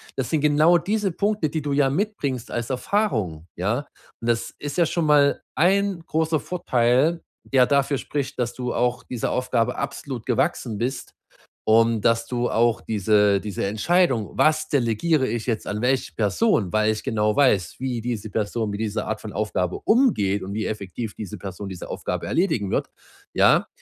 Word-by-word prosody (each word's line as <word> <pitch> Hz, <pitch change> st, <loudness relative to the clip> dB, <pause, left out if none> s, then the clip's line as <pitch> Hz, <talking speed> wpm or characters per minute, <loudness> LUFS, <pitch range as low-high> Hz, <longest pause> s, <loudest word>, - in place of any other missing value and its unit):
Das 130 Hz, -3 st, -2 dB
sind 155 Hz, -, +1 dB
genau 150 Hz, +4 st, +4 dB
diese 205 Hz, +2 st, -1 dB
Punkte, 205 Hz, -4 st, 0 dB
die 155 Hz, +1 st, -2 dB
du 145 Hz, -1 st, -2 dB
ja 140 Hz, -1 st, +3 dB
mitbringst 140 Hz, -, -2 dB
als 115 Hz, -1 st, -3 dB
Erfahrung, 125 Hz, -, -1 dB
ja? 105 Hz, +8 st, 0 dB, 0.4 s
Und 115 Hz, -, -2 dB
das 115 Hz, 0 st, -1 dB
ist 145 Hz, -1 st, -6 dB
ja 170 Hz, -, +4 dB
schon 170 Hz, +1 st, -1 dB
mal 145 Hz, -1 st, +4 dB
1 195 Hz, +1 st, +2 dB
großer 160 Hz, 0 st, +1 dB
Vorteil, 135 Hz, 0 st, +1 dB, 0.3 s
der 130 Hz, -2 st, +5 dB
dafür 140 Hz, -1 st, +1 dB
spricht, 140 Hz, -3 st, -4 dB
dass 120 Hz, -1 st, -1 dB
du 125 Hz, -1 st, -3 dB
auch 125 Hz, 0 st, 0 dB
dieser 120 Hz, -3 st, -3 dB
Aufgabe 125 Hz, -1 st, 0 dB
absolut 130 Hz, -5 st, -5 dB
gewachsen 120 Hz, -4 st, -1 dB
bist 130 Hz, +3 st, -3 dB, 0.5 s
und 115 Hz, 0 st, +4 dB
dass 115 Hz, +1 st, +2 dB
du 120 Hz, 0 st, -1 dB
auch 115 Hz, -2 st, +2 dB
diese 105 Hz, -1 st, +2 dB
diese 105 Hz, -3 st, -3 dB
Entscheidung: 115 Hz, -, +1 dB
„Was 155 Hz, 0 st, +3 dB
delegiere 130 Hz, +3 st, +1 dB
ich 115 Hz, +1 st, -3 dB
jetzt 115 Hz, -3 st, -2 dB
an 105 Hz, +1 st, -3 dB
welche 130 Hz, +1 st, 0 dB
Person, 105 Hz, -, +1 dB
weil 110 Hz, 0 st, +3 dB
ich 110 Hz, -, -4 dB
genau 105 Hz, -1 st, 0 dB
weiß, 105 Hz, -11 st, +2 dB
wie 125 Hz, -3 st, -2 dB
diese 110 Hz, -2 st, -4 dB
Person 110 Hz, +1 st, -1 dB
mit 100 Hz, -, -5 dB
dieser 105 Hz, 0 st, -2 dB
Art 110 Hz, -1 st, -3 dB
von 105 Hz, -, -7 dB
Aufgabe 95 Hz, -4 st, -1 dB
umgeht 105 Hz, -, +3 dB
und 95 Hz, -, -6 dB
wie 110 Hz, -, -2 dB
effektiv 105 Hz, +1 st, -5 dB
diese 105 Hz, -4 st, -7 dB
Person 95 Hz, +1 st, -7 dB
diese 95 Hz, -2 st, -7 dB
Aufgabe -, -, -4 dB
erledigen 120 Hz, -, 0 dB
wird,“ -, -, -1 dB, 0.5 s
ja, -, -, +4 dB
120 Hz, 175 wpm, -23 LUFS, 110-150 Hz, 0.5 s, der